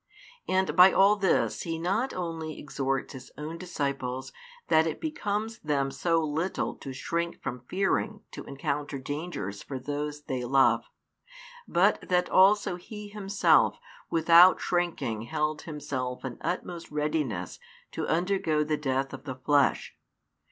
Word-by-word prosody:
And 190 0 +1
by 185 +1 +9
all 200 +2 +5
this 195 -3 +1
He 165 -1 -3
not 195 +10 0
only 165 -3 -4
exhorts 135 -1 -2
His 130 -1 -10
own 155 +3 -6
disciples 140 -7 -3 0.3
that 160 +1 +4
it 160 - -3
becomes 220 -7 -3
them 140 -3 0
so 165 +5 +1
little 155 +5 -1
to 135 - -7
shrink 170 +6 -3
from 125 - -5
fearing 200 +3 0
to - - -8
encounter 140 0 -3
dangers 145 - -5
for 135 - -6
those 145 +2 -4
they 130 -3 -3
love, 135 +2 +3 0.8
but - - +3
that 180 -1 +2
also 190 -1 +4
He 210 +3 -9
Himself 205 -1 +3 0.3
without 170 +3 +7
shrinking 175 -11 -1
held 150 +3 -1
Himself 130 -5 -4
in 125 -2 -6
utmost 175 -1 -4
readiness 150 - -2 0.3
to - - -3
undergo 165 -3 +1
the 150 0 -1
death 135 -1 -1
of - - -9
the 130 -3 -5
flesh. 140 +2 +1
155 Hz, 135 wpm, -28 LUFS, 135-180 Hz, 0.8 s, by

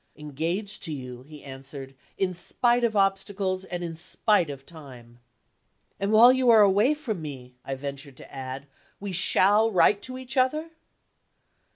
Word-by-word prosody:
"Engaged 165 +8 -4
to 165 - -5
you," 125 -4 -7
he 150 +2 -14
answered, 135 0 -10 0.2
"in 185 -1 -1
spite 240 +7 0
of 225 -2 +1
obstacles 195 -1 0
and 175 -1 -5
in 165 -1 -5
spite 175 +1 +1
of 135 -1 -8
time." 125 -7 -14 0.8
"And 200 +1 -1
while 235 +3 +7
you 260 -1 +2
are 225 -2 +7
away 205 +9 +3
from 225 - -5
me," 130 -5 -9
I 135 - -4
ventured 140 0 -8
to - - -14
add, 130 +1 -7 0.3
"we 200 -1 -6
shall 200 +4 +3
write 200 +1 +3
to 255 0 -7
each 260 +2 -7
other?" 305 +6 +1
180 Hz, 160 wpm, -26 LUFS, 140-215 Hz, 0.8 s, while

